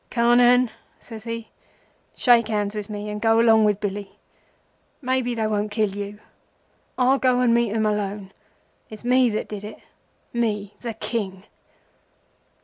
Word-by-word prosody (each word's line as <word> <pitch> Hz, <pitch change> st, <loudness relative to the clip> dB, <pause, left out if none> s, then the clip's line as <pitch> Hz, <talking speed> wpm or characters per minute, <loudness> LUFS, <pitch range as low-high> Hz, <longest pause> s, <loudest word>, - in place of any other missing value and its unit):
Carnehan,' 245 Hz, 0 st, +4 dB, 0.3 s
says 225 Hz, -2 st, -11 dB
he, 230 Hz, -1 st, -5 dB, 0.7 s
'shake 240 Hz, -3 st, +4 dB
hands 210 Hz, -2 st, -1 dB
with 210 Hz, -1 st, -5 dB
me 210 Hz, 0 st, -5 dB
and 210 Hz, 0 st, -5 dB
go 225 Hz, 0 st, +4 dB
along 225 Hz, -2 st, +5 dB
with 210 Hz, -1 st, +1 dB
Billy. 205 Hz, -1 st, -4 dB, 0.9 s
Maybe 255 Hz, -2 st, -1 dB
they 220 Hz, -1 st, -1 dB
won't 210 Hz, -1 st, -1 dB
kill 210 Hz, -1 st, 0 dB
you. 205 Hz, 0 st, -6 dB, 0.8 s
I'll 260 Hz, +1 st, +3 dB
go 255 Hz, -1 st, +2 dB
and 245 Hz, -2 st, +3 dB
meet 235 Hz, -2 st, +2 dB
'em 220 Hz, 0 st, 0 dB
alone. 205 Hz, -2 st, -2 dB, 0.6 s
It's 215 Hz, +2 st, -10 dB
me 250 Hz, 0 st, +4 dB
that 215 Hz, -, -3 dB
did 210 Hz, -1 st, -7 dB
it. 210 Hz, +1 st, -8 dB, 0.6 s
Me, 210 Hz, -4 st, -1 dB
the 235 Hz, -3 st, -5 dB
King! 195 Hz, -5 st, -4 dB
220 Hz, 145 wpm, -23 LUFS, 210-235 Hz, 0.9 s, along